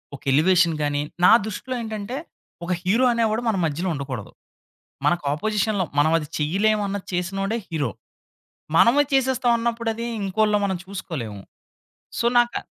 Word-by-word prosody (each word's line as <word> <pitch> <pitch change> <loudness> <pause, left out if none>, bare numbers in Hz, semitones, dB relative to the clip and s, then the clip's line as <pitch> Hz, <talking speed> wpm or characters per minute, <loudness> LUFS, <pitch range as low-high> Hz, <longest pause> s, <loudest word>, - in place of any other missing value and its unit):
ఒక - - -13
ఎలివేషన్ 170 +2 +4
గానీ 145 0 0 0.2
నా - - +8
దృష్టిలో 250 +5 -5
ఏంటంటే 220 +3 -5 0.5
ఒక 185 - -3
హీరో 220 +8 +3
అనేవాడు 225 -1 +1
మన 220 - +1
మధ్యలో 165 +5 -2
ఉండకూడదు. 130 -6 -6 0.8
మనకు 175 -3 +1
అపోజిషన్‌లో 210 +2 0 0.2
మనమది 155 0 +2
చెయ్యలేము 205 +8 +1
అన్నది 200 -1 -4
చేసినోడే 195 +5 -1
హీరో. 145 -8 -1 0.9
మనమే 260 +5 +6
చేసేస్తాం 260 -2 +2
అన్నప్పుడది 230 0 -2 0.2
ఇంకోళ్ళో 210 +2 +2
మనం 190 -2 -1
చూసుకోలేము. 145 - -6 0.8
సో - - 0
నాకా 240 0 +1
195 Hz, 125 wpm, -23 LUFS, 165-225 Hz, 0.9 s, నా